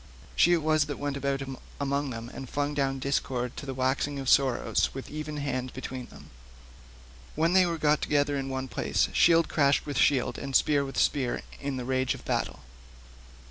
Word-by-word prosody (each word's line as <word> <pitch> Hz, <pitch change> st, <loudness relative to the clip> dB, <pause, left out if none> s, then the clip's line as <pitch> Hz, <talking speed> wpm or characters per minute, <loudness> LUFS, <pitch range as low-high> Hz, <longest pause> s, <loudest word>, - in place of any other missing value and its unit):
She 175 Hz, -, +5 dB
it 165 Hz, -3 st, +1 dB
was 155 Hz, -1 st, +3 dB
that 145 Hz, -1 st, -5 dB
went 145 Hz, -1 st, -3 dB
about 140 Hz, 0 st, -1 dB, 0.4 s
among 140 Hz, 0 st, -1 dB
them 115 Hz, -1 st, -6 dB
and 130 Hz, -, -8 dB
flung 145 Hz, 0 st, -1 dB
down 135 Hz, -2 st, 0 dB
discord 130 Hz, -2 st, -2 dB
to 140 Hz, -, -7 dB
the 135 Hz, -, -3 dB
waxing 130 Hz, +2 st, 0 dB
of 135 Hz, -1 st, -2 dB
sorrow 130 Hz, -4 st, +3 dB, 0.2 s
with 135 Hz, -, -7 dB
even 150 Hz, 0 st, -5 dB
hand 130 Hz, -3 st, -3 dB
between 130 Hz, -1 st, -6 dB
them. -, -, -15 dB, 1.0 s
When 165 Hz, +3 st, +2 dB
they 185 Hz, -1 st, +5 dB
were 170 Hz, -1 st, -2 dB
got 150 Hz, -1 st, +2 dB
together 145 Hz, -1 st, +1 dB
in 135 Hz, -1 st, -3 dB
one 130 Hz, 0 st, -3 dB
place -, -, 0 dB
shield 165 Hz, -1 st, +5 dB
clashed 140 Hz, -2 st, +2 dB
with 145 Hz, -2 st, -2 dB
shield 135 Hz, -4 st, +2 dB
and 135 Hz, -1 st, -5 dB
spear 145 Hz, -2 st, +4 dB
with 135 Hz, -1 st, -6 dB
spear 130 Hz, -4 st, +1 dB, 0.2 s
in 140 Hz, -1 st, -3 dB
the 125 Hz, -, -4 dB
rage 130 Hz, 0 st, 0 dB
of -, -, -13 dB
battle. -, -, -2 dB
140 Hz, 190 wpm, -28 LUFS, 130-145 Hz, 1.0 s, She